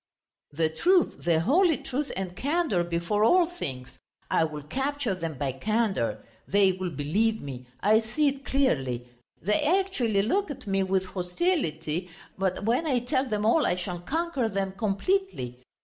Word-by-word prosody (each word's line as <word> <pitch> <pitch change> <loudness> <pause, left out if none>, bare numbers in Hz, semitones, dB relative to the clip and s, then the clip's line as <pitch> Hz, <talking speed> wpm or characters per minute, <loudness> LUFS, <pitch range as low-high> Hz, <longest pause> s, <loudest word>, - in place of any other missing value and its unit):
"The 160 +2 +1
truth, 350 - +2
the 165 -2 +3
holy 325 - +4
truth 280 +3 -3
and 185 -1 -4
candour 290 - +1
before 170 +5 0
all 355 +10 +5
things! 130 - -7 0.3
I 160 - +3
will 150 -2 -6
capture 270 - -1
them 165 -5 -4
by 135 0 -1
candour. 205 - -1 0.2
They 200 -1 +4
will 185 0 -3
believe 195 +10 0
me, 125 -3 -8
I 215 +2 +5
see 290 +7 0
it 275 0 -1
clearly; 135 - 0 0.4
they 210 +4 +2
actually 295 - +2
look 385 - +1
at 275 -2 -7
me 195 -1 +1
with 190 0 +1
hostility, 180 - -1 0.3
but 190 0 -1
when 250 +9 +1
I 255 -5 +2
tell 260 +2 0
them 210 -1 -1
all 290 +8 +4
I - - +2
shall 180 -1 -4
conquer 280 - -1
them 195 -2 -1
completely. 200 - -1
200 Hz, 160 wpm, -27 LUFS, 170-275 Hz, 0.4 s, all